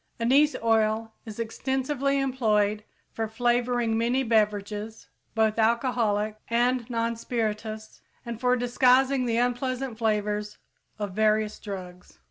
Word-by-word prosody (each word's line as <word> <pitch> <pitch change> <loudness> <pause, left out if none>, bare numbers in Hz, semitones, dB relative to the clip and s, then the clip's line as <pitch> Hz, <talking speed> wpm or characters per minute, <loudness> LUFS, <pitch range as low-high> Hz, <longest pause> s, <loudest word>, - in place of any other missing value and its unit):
Anise 275 +6 +4
oil 220 0 +1
is 220 0 -8
extensively 265 +4 -1
employed 215 -6 +1 0.3
for 225 -1 -3
flavoring 240 0 +1
many 240 +4 +1
beverages 210 -1 -1 0.3
both 220 0 +2
alcoholic 220 -2 +1
and 240 +1 +1
non 230 -1 -1
spirituous 220 -2 -4 0.2
and 235 0 -6
for 250 0 +3
disguising 255 +2 +3
the 230 -1 0
unpleasant 245 0 -1
flavors 210 -1 -1 0.4
of 205 -2 -4
various 215 0 +1
drugs. 180 -3 -9
230 Hz, 110 wpm, -26 LUFS, 215-250 Hz, 0.4 s, Anise